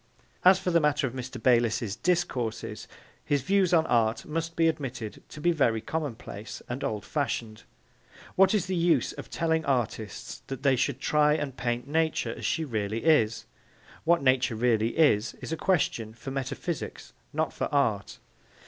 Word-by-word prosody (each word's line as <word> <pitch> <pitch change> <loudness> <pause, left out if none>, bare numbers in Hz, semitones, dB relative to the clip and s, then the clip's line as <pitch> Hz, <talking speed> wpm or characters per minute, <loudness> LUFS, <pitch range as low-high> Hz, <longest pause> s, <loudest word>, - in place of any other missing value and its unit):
As 185 +1 +7
for 185 -1 -2
the 170 - +5
matter 150 -2 +2
of 125 - -3
Mr. 130 0 -6
Bayliss's 115 -3 +2
discourses, 125 -10 -2 0.4
his 145 -3 0
views 195 +1 +2
on 165 -2 +4
art 115 -2 +1
must 165 +1 -3
be 165 -1 +3
admitted 130 -8 -3
to - - -10
be 175 +4 +3
very 120 -9 +2
commonplace 115 -5 -5
and 125 +3 -4
old 105 -2 -3
fashioned. 115 -6 -3 0.7
What 195 +3 +5
is 195 -4 +1
the 185 0 -2
use 165 -6 +2
of - - -9
telling 160 -1 0
artists 120 -6 -2
that 135 0 -6
they 135 -2 +4
should 130 +1 -1
try 150 +1 +3
and 140 -4 -3
paint 120 +1 -2
Nature 160 +2 0
as - - -4
she 160 -1 0
really 110 -3 -2
is? 115 -9 +3 0.6
What 170 -1 +3
Nature 130 -3 +3
really 115 +1 +1
is, 125 -9 +3
is - - -8
a - - 0
question 140 - 0
for 135 +3 -7
metaphysics 135 +5 -4 0.2
not - - -1
for - - -2
art. - - 0
135 Hz, 165 wpm, -28 LUFS, 115-160 Hz, 0.7 s, As